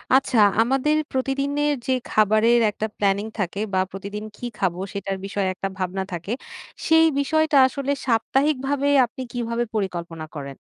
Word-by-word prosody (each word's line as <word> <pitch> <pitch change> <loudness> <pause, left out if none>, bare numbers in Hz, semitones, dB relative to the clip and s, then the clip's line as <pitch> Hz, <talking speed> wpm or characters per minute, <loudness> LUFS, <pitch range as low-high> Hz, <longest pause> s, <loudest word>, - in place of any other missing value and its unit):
আচ্ছা 265 -2 +2 0.2
আমাদের 270 +5 +2 0.2
প্রতিদিনের 280 +3 0
যে - - +1 0.2
খাবারের 215 +3 +4
একটা 220 +1 -3
প্ল্যানিং 200 0 +1
থাকে 195 0 -2
বা 185 - +3
প্রতিদিন 200 +2 -6
কী - - -7
খাবো? 180 -2 -1
সেটার 195 -1 -3
বিষয়ে 195 -1 -1
একটা 195 +1 -4
ভাবনা 190 0 -2
থাকে। 175 +4 -5 0.6
সেই 320 0 +6
বিষয়টা 315 +1 +2
আসলে 275 +1 -3
সাপ্তাহিক 270 +5 +2
ভাবে 285 0 0 0.2
আপনি 240 +2 -10
কীভাবে 235 -1 -2
পরিকল্পনা 170 -5 -3
করেন? 140 -2 -7
225 Hz, 145 wpm, -23 LUFS, 195-275 Hz, 0.6 s, সেই